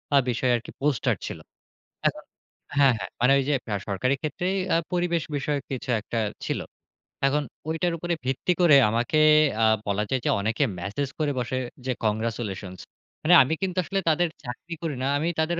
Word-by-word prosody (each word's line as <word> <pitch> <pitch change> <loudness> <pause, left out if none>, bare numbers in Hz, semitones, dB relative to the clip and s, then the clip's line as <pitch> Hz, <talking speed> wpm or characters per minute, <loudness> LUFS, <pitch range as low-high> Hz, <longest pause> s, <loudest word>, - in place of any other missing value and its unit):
আ - - +8
বিষয়ে 125 +1 +1
আরকি 120 - -5
পোস্টার 145 -5 +1
ছিল। - - -6 0.7
এখন, - - -3 0.5
হ্যাঁ, 135 -3 +6
হ্যাঁ, 95 -3 -6
মানে 125 +2 +5
ওই 135 - +1
যে - - +3 0.2
আ - - 0
সরকারি 125 +8 +1
ক্ষেত্রেই 180 +6 -2 0.2
আ - - +5 0.2
পরিবেশ 175 -2 +1
বিষয়ক 140 0 -1
কিছু 130 0 -5
একটা 115 +1 -3 0.3
ছিল। - - -1 0.7
এখন 145 +1 +1 0.3
ওইটার 165 +2 0
উপরে 175 +1 -2
ভিত্তি 135 +7 0
করে 165 -5 +7
আমাকে 115 +7 0 0.5
আ - - +6 0.2
বলা 100 +1 +1
যায় 130 - +1
যে - - +2
অনেকে 115 +7 0 0.2
ম্যাসেজ 105 +10 -3
করে 150 -2 +1
বসে 125 +1 -2 0.3
যে 130 - 0
congratulations 105 -4 -2 0.4
মানে 170 - +5
আমি 140 - -1
কিন্তু 185 -1 -2
আসলে 195 +3 -1
তাদের 170 +2 +2
চাকরি 125 +7 -7
করি 155 -4 -2
না। 135 - +1
আমি 160 +3 -1
তাদের 170 +2 +1
135 Hz, 175 wpm, -25 LUFS, 115-160 Hz, 0.7 s, আ